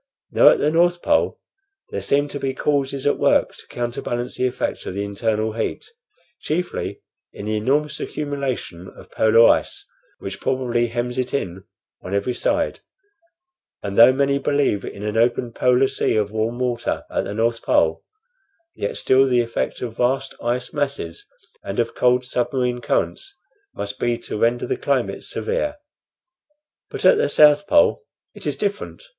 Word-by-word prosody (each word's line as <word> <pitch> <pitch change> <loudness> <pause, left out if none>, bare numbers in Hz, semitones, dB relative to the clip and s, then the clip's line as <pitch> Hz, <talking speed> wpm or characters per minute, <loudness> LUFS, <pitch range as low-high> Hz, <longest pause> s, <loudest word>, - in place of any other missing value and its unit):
Now - - +7
at - - +4
the 150 - +1
North 175 +1 +2
Pole 295 - +1 0.5
there - - -3
seem 145 +1 +1
to 145 - -5
be 135 -1 -2
causes 140 -2 -1
at 145 - +2
work - - +2
to - - -16
counterbalance 120 0 -4
the 130 - +1
effect 125 - -3
of 95 - -5
the 100 - -2
internal 110 +2 -1
heat, 115 - -3 0.5
chiefly 175 +4 -3 0.3
in 100 - -8
the 110 0 -1
enormous 145 +7 0
accumulation 135 - -4
of - - -15
polar 115 +1 +5
ice 400 0 +1 0.3
which - - -7
probably 120 -2 0
hems 120 +2 -3
it 130 +1 -2
in 95 -7 -4 0.4
on 95 +2 -4
every 100 +5 0
side; - - -1 1.0
and 100 -1 -4
though 120 +4 +8
many 140 +1 +1
believe 140 -8 +1
in 100 - -7
an 105 +1 -2
open 120 0 +1
polar 125 +2 +3
sea - - 0
of 105 -1 0
warm 110 +2 -1
water 125 -1 -2
at - - -1
the 100 - -5
North 115 +1 0
Pole, - - +2 0.7
yet 475 - -4
still 135 +1 +4
the 125 -2 +3
effect 115 +1 -3
of 115 -2 -6
vast 135 +2 0
ice 125 +3 -2
masses 140 - -3 0.4
and 100 - -5
of 115 -1 0
cold 125 0 +2
submarine 125 0 -1
currents 390 - -2 0.4
must 100 0 -5
be 120 -1 0
to 115 -2 -6
render 120 +2 +1
the 390 - -2
climate 420 - -1
severe. 455 -11 -2 1.1
But - - -5
at - - +7
the 475 - +2
South 150 +6 +5
Pole 295 - +4 0.3
it - - -8
is - - -1
different. 205 - -3
125 Hz, 165 wpm, -22 LUFS, 115-140 Hz, 1.1 s, though